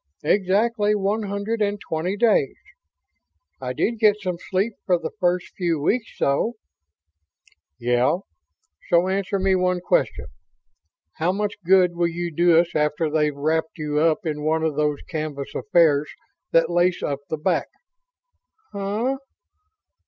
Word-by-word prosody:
Exactly 205 Hz, +5 st, +2 dB
one 205 Hz, +2 st, 0 dB
hundred 205 Hz, +2 st, -3 dB
and 205 Hz, 0 st, 0 dB
twenty 175 Hz, +3 st, -3 dB
days. 230 Hz, 0 st, +2 dB, 1.1 s
I -, -, -3 dB
did 230 Hz, -1 st, -1 dB
get 210 Hz, -2 st, +4 dB
some 180 Hz, -4 st, -3 dB
sleep 195 Hz, +5 st, 0 dB
for 180 Hz, -2 st, +2 dB
the 165 Hz, -, -5 dB
first 180 Hz, -1 st, 0 dB
few 170 Hz, -4 st, 0 dB
weeks, 225 Hz, -, -1 dB
though." 180 Hz, +12 st, +1 dB, 1.2 s
"Yeah. 120 Hz, +6 st, +2 dB, 0.7 s
So 175 Hz, +1 st, +4 dB
answer 195 Hz, +1 st, -1 dB
me 190 Hz, 0 st, +2 dB
one 180 Hz, 0 st, +1 dB
question. -, -, 0 dB, 0.9 s
How 165 Hz, +3 st, +1 dB
much 205 Hz, +1 st, -2 dB
good 180 Hz, -1 st, +4 dB
will 170 Hz, 0 st, +1 dB
you 170 Hz, 0 st, -4 dB
do 170 Hz, 0 st, +5 dB
us 170 Hz, 0 st, +2 dB
after 150 Hz, +1 st, 0 dB
they've 150 Hz, -2 st, +1 dB
wrapped 160 Hz, +2 st, -1 dB
you 150 Hz, -1 st, -1 dB
up 165 Hz, +4 st, +2 dB
in 150 Hz, -2 st, -2 dB
one 160 Hz, +1 st, +1 dB
of 160 Hz, -2 st, 0 dB
those 150 Hz, -1 st, 0 dB
canvas 155 Hz, -5 st, -5 dB
affairs 160 Hz, -7 st, +3 dB, 0.4 s
that 165 Hz, +1 st, +3 dB
lace 175 Hz, +1 st, +2 dB
up 140 Hz, -1 st, -2 dB
the 160 Hz, -, -2 dB
back?" 150 Hz, -, 0 dB, 1.1 s
"Huh? 210 Hz, +7 st, -1 dB
175 Hz, 140 wpm, -23 LUFS, 155-200 Hz, 1.2 s, do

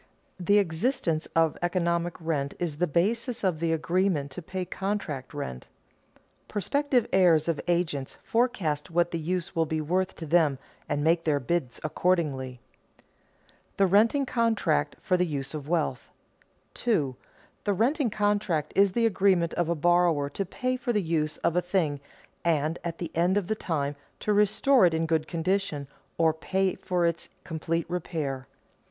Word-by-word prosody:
The 200 Hz, +3 st, +3 dB
existence 170 Hz, -, 0 dB
of 165 Hz, -1 st, +2 dB
economic 175 Hz, -1 st, 0 dB
rent 150 Hz, -4 st, -2 dB
is 165 Hz, -4 st, -3 dB
the 180 Hz, +2 st, +1 dB
basis 225 Hz, -, 0 dB
of 180 Hz, -5 st, +1 dB
the 165 Hz, 0 st, 0 dB
agreement 165 Hz, -3 st, 0 dB
to 180 Hz, -, -7 dB
pay 185 Hz, +2 st, -4 dB
contract 185 Hz, -10 st, -3 dB
rent. 65 Hz, -, -6 dB, 0.8 s
Prospective 250 Hz, +3 st, +1 dB
hirers 170 Hz, -5 st, +5 dB
of 165 Hz, -3 st, 0 dB
agents 165 Hz, -6 st, -1 dB
forecast 200 Hz, -11 st, 0 dB
what 175 Hz, 0 st, +1 dB
the 170 Hz, -, -2 dB
use 180 Hz, +3 st, -3 dB
will 165 Hz, -1 st, +2 dB
be 160 Hz, 0 st, -1 dB
worth 185 Hz, +5 st, 0 dB
to 165 Hz, -, -7 dB
them 155 Hz, -3 st, +3 dB, 0.3 s
and 145 Hz, 0 st, 0 dB
make 165 Hz, +1 st, +3 dB
their 150 Hz, -3 st, +2 dB
bids 140 Hz, -1 st, -2 dB
accordingly. 150 Hz, -7 st, 0 dB, 0.4 s
[Sidenote: -, -, -35 dB
The 195 Hz, -, +5 dB
renting 225 Hz, +9 st, +4 dB
contract 230 Hz, -, +1 dB
for 180 Hz, -, +2 dB
the 180 Hz, -, +2 dB
use 140 Hz, -2 st, -4 dB
of 150 Hz, -1 st, -6 dB
wealth] 155 Hz, -8 st, -1 dB, 0.6 s
2. 150 Hz, -, 0 dB, 0.5 s
_The 200 Hz, -3 st, 0 dB
renting 260 Hz, +2 st, +2 dB
contract 205 Hz, -7 st, 0 dB
is 200 Hz, -1 st, +4 dB
the 235 Hz, -1 st, +2 dB
agreement 190 Hz, -5 st, +2 dB
of 175 Hz, -1 st, 0 dB
a 170 Hz, -, +1 dB
borrower 170 Hz, -3 st, +2 dB
to 195 Hz, -, -2 dB
pay 255 Hz, +5 st, -2 dB
for 250 Hz, -1 st, -2 dB
the 210 Hz, -4 st, +1 dB
use 155 Hz, -2 st, -1 dB
of 170 Hz, 0 st, +2 dB
a 180 Hz, -, +3 dB
thing 175 Hz, -6 st, 0 dB, 0.4 s
and, 160 Hz, 0 st, +1 dB
at 170 Hz, -1 st, -4 dB
the 170 Hz, -, -5 dB
end 175 Hz, +4 st, +3 dB
of 205 Hz, -, 0 dB
the 220 Hz, -, 0 dB
time, 145 Hz, -7 st, -2 dB, 0.3 s
to 210 Hz, -, +1 dB
restore 215 Hz, +3 st, +4 dB
it 165 Hz, -, 0 dB
in 165 Hz, 0 st, 0 dB
good 160 Hz, -1 st, 0 dB
condition 170 Hz, -4 st, -1 dB, 0.3 s
or 160 Hz, -1 st, +4 dB
pay 190 Hz, +4 st, 0 dB
for 180 Hz, -2 st, -1 dB
its 170 Hz, 0 st, -1 dB
complete 165 Hz, +1 st, -2 dB
repair. 155 Hz, -6 st, -3 dB
170 Hz, 165 wpm, -27 LUFS, 155-195 Hz, 0.8 s, hirers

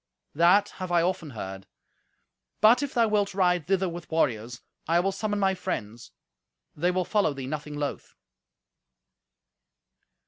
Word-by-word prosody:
That 180 Hz, +6 st, +4 dB
have 185 Hz, -1 st, -4 dB
I 170 Hz, -1 st, +3 dB
often 180 Hz, -3 st, -2 dB
heard. 95 Hz, -5 st, -7 dB, 0.9 s
But 220 Hz, +5 st, +6 dB
if 285 Hz, -2 st, -4 dB
thou 230 Hz, -2 st, +4 dB
wilt 205 Hz, -2 st, 0 dB
ride 180 Hz, -4 st, +2 dB
thither 190 Hz, 0 st, +1 dB
with 170 Hz, -2 st, -7 dB
warriors, 120 Hz, -7 st, -1 dB, 0.3 s
I 165 Hz, +2 st, +3 dB
will 195 Hz, +2 st, +1 dB
summon 205 Hz, +1 st, -2 dB
my 195 Hz, -1 st, +2 dB
friends. 115 Hz, -, -5 dB, 0.7 s
They 175 Hz, +4 st, +1 dB
will 180 Hz, 0 st, 0 dB
follow 205 Hz, -9 st, +1 dB
thee 135 Hz, -1 st, -6 dB
nothing 150 Hz, +1 st, -5 dB
loth." 145 Hz, -1 st, -5 dB
175 Hz, 140 wpm, -27 LUFS, 145-195 Hz, 0.9 s, But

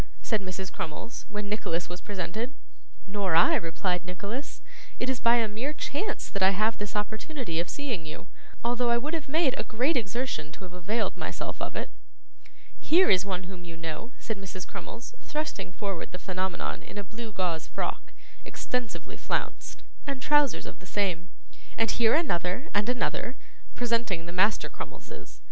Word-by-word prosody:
said 220 Hz, -3 st, +2 dB
Mrs. 185 Hz, 0 st, -4 dB
Crummles, 165 Hz, +9 st, -4 dB
when 210 Hz, -1 st, -3 dB
Nicholas 175 Hz, -5 st, 0 dB
was 175 Hz, +1 st, -6 dB
presented. 210 Hz, +7 st, -2 dB, 0.5 s
'Nor 195 Hz, -4 st, +1 dB
I,' 165 Hz, -, +8 dB
replied 180 Hz, +2 st, +1 dB
Nicholas. 200 Hz, +9 st, -4 dB, 0.4 s
'It 250 Hz, -, +1 dB
is 260 Hz, -2 st, +1 dB
by 235 Hz, 0 st, +6 dB
a 230 Hz, -2 st, +4 dB
mere 230 Hz, +8 st, -2 dB
chance 380 Hz, +8 st, -2 dB
that 200 Hz, -, -3 dB
I 190 Hz, -, +8 dB
have 215 Hz, +2 st, +3 dB
this 205 Hz, 0 st, -3 dB
opportunity 220 Hz, -, -1 dB
of 170 Hz, -, 0 dB
seeing 240 Hz, -, -2 dB
you, 155 Hz, -, -6 dB, 0.4 s
although 240 Hz, 0 st, +3 dB
I 235 Hz, -, +5 dB
would 295 Hz, +7 st, -1 dB
have 315 Hz, -4 st, -1 dB
made 310 Hz, -3 st, +4 dB
a -, -, +1 dB
great 255 Hz, +9 st, +2 dB
exertion 225 Hz, -, 0 dB
to -, -, -9 dB
have 180 Hz, -1 st, -8 dB
availed 195 Hz, +6 st, 0 dB
myself -, -, -3 dB
of -, -, -2 dB
it.' -, -, -2 dB, 0.9 s
'Here 355 Hz, +4 st, +6 dB
is 185 Hz, 0 st, +5 dB
one 190 Hz, -2 st, -1 dB
whom 180 Hz, -1 st, -8 dB
you 165 Hz, -1 st, -8 dB
know,' 165 Hz, +8 st, -4 dB
said 220 Hz, -4 st, -3 dB
Mrs. 185 Hz, -1 st, -5 dB
Crummles, 235 Hz, -, -7 dB
thrusting 305 Hz, -10 st, -2 dB
forward 195 Hz, -2 st, -3 dB
the 180 Hz, -, -4 dB
Phenomenon 185 Hz, 0 st, -1 dB
in -, -, -9 dB
a 205 Hz, -, -1 dB
blue 220 Hz, +4 st, -6 dB
gauze 180 Hz, -5 st, 0 dB
frock, -, -, -2 dB, 0.3 s
extensively 250 Hz, -3 st, -3 dB
flounced, -, -, -2 dB, 0.2 s
and 275 Hz, -2 st, -1 dB
trousers 295 Hz, -1 st, +4 dB
of -, -, -7 dB
the 185 Hz, -, -12 dB
same; 185 Hz, -3 st, +1 dB, 0.5 s
'and 225 Hz, -, +4 dB
here 230 Hz, +1 st, +5 dB
another 195 Hz, -, +1 dB
and 205 Hz, +3 st, +3 dB
another,' 250 Hz, +1 st, +1 dB, 0.4 s
presenting 230 Hz, -8 st, +1 dB
the 175 Hz, -, -6 dB
Master 190 Hz, +4 st, +4 dB
Crummleses. -, -, -8 dB
210 Hz, 170 wpm, -30 LUFS, 180-245 Hz, 0.9 s, I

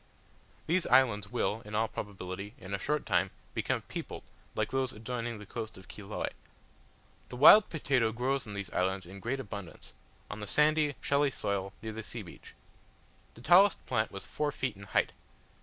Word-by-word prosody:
These 175 Hz, +2 st, +1 dB
islands 105 Hz, -6 st, +4 dB
will, 115 Hz, -2 st, 0 dB
in 105 Hz, 0 st, -7 dB
all 110 Hz, +1 st, +2 dB
probability, 100 Hz, 0 st, -6 dB
in 100 Hz, -6 st, -8 dB
a 100 Hz, -, -1 dB
short 150 Hz, +8 st, -1 dB
time 95 Hz, -1 st, +2 dB, 0.2 s
become -, -, -1 dB
peopled -, -, -6 dB, 0.3 s
like -, -, -1 dB
those 135 Hz, -1 st, 0 dB
adjoining 115 Hz, +1 st, -4 dB
the 105 Hz, -, -10 dB
coast 110 Hz, 0 st, -6 dB
of 95 Hz, -1 st, -13 dB
Chiloe. 105 Hz, 0 st, -4 dB, 1.0 s
The -, -, -7 dB
wild 195 Hz, -, +9 dB
potato 135 Hz, -7 st, +1 dB
grows 125 Hz, +3 st, -1 dB
on 105 Hz, -, -6 dB
these 100 Hz, -1 st, -5 dB
islands 95 Hz, +1 st, 0 dB
in 95 Hz, +3 st, -10 dB
great 125 Hz, +7 st, -2 dB
abundance, 100 Hz, -, -8 dB, 0.3 s
on 105 Hz, -, -7 dB
the 105 Hz, -, -6 dB
sandy, 150 Hz, +1 st, +3 dB
shelly 140 Hz, 0 st, +3 dB
soil 100 Hz, -6 st, -2 dB
near 110 Hz, -1 st, -4 dB
the 110 Hz, -, -5 dB
sea 110 Hz, 0 st, -7 dB
beach. 85 Hz, -, -13 dB, 0.8 s
The 115 Hz, -, -12 dB
tallest 185 Hz, +9 st, +6 dB
plant 110 Hz, -3 st, 0 dB
was 100 Hz, -, -7 dB
four 150 Hz, -1 st, -1 dB
feet 130 Hz, -5 st, -2 dB
in 100 Hz, +1 st, -11 dB
height. -, -, +2 dB
110 Hz, 175 wpm, -31 LUFS, 100-135 Hz, 1.0 s, wild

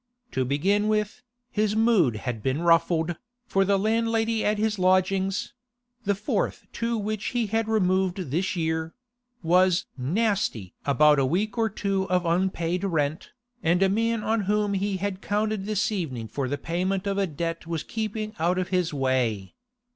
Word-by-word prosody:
To 130 Hz, -, 0 dB
begin 190 Hz, +11 st, +1 dB
with, 210 Hz, +2 st, 0 dB, 0.3 s
his 210 Hz, 0 st, +1 dB
mood 220 Hz, -, +3 dB
had 115 Hz, 0 st, -4 dB
been 135 Hz, +8 st, -1 dB
ruffled, 165 Hz, 0 st, +3 dB, 0.3 s
for 195 Hz, -4 st, +2 dB
the 200 Hz, +1 st, +2 dB
landlady 225 Hz, +1 st, +1 dB
at 210 Hz, 0 st, +1 dB
his 215 Hz, -1 st, 0 dB
lodgings—the 200 Hz, +5 st, -1 dB
fourth 215 Hz, -, -2 dB
to 230 Hz, 0 st, -1 dB
which 215 Hz, 0 st, -3 dB
he 235 Hz, -, +2 dB
had 225 Hz, +1 st, -1 dB
removed 190 Hz, -3 st, +1 dB
this 185 Hz, +6 st, 0 dB
year—was 185 Hz, +2 st, 0 dB
'nasty' 170 Hz, -, 0 dB
about 150 Hz, +1 st, +5 dB
a 135 Hz, -, +3 dB
week 195 Hz, +7 st, 0 dB
or 225 Hz, -1 st, +1 dB
two 195 Hz, -1 st, -1 dB
of 180 Hz, -1 st, +1 dB
unpaid 175 Hz, 0 st, 0 dB
rent, 155 Hz, -5 st, -1 dB, 0.3 s
and 175 Hz, +2 st, +3 dB
a 190 Hz, -, +4 dB
man 225 Hz, +2 st, 0 dB
on 225 Hz, 0 st, +1 dB
whom 210 Hz, 0 st, +1 dB
he 195 Hz, 0 st, -1 dB
had 195 Hz, 0 st, -3 dB
counted 210 Hz, -1 st, -1 dB
this 215 Hz, +2 st, 0 dB
evening 135 Hz, -, -3 dB
for 130 Hz, +4 st, -3 dB
the 145 Hz, +3 st, -2 dB
payment 185 Hz, +5 st, -2 dB
of 200 Hz, 0 st, 0 dB
a 195 Hz, -, +1 dB
debt 165 Hz, +1 st, -4 dB
was 165 Hz, -2 st, -2 dB
keeping 215 Hz, -1 st, -4 dB
out 175 Hz, +3 st, +1 dB
of 185 Hz, -1 st, -1 dB
his 180 Hz, -3 st, +1 dB
way. 130 Hz, -8 st, 0 dB
190 Hz, 160 wpm, -26 LUFS, 165-215 Hz, 0.3 s, about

